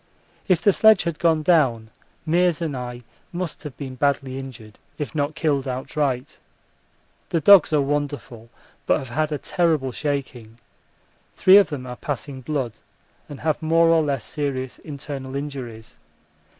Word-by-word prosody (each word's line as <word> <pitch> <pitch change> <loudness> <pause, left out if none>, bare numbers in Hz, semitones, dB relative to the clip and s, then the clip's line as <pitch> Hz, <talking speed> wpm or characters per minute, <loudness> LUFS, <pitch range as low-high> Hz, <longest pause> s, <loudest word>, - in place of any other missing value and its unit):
If 185 -3 +2
the 200 - +5
sledge 220 -1 +5
had 170 -2 -3
gone 160 -2 +2
down 125 -10 +2 0.4
Meares 175 0 +2
and 160 -5 -3
I 125 -1 -6 0.3
must 175 -2 -5
have 150 -4 -9
been 135 -3 -6
badly 135 0 -1
injured, 115 -5 -11 0.2
if 150 - -5
not 150 0 -1
killed 145 -5 0
outright. 130 +1 -2 0.9
The 165 - +1
dogs 185 +2 +7
are 150 -2 +3
wonderful, 140 -5 -3 0.4
but - - +4
have 130 - -7
had 155 +5 -1
a 150 - -1
terrible 155 -5 0
shaking 125 -5 -4 0.8
three 190 +1 +7
of 205 - +5
them 140 -5 -5
are 125 -1 -7
passing 140 0 -5
blood 130 -3 -2 0.6
and 145 - -9
have 155 0 0
more 165 +1 +3
or 165 -1 +5
less 140 -7 -2
serious 130 -2 -3
internal 140 -2 -7
injuries. 130 -6 -7
145 Hz, 150 wpm, -23 LUFS, 130-160 Hz, 0.9 s, dogs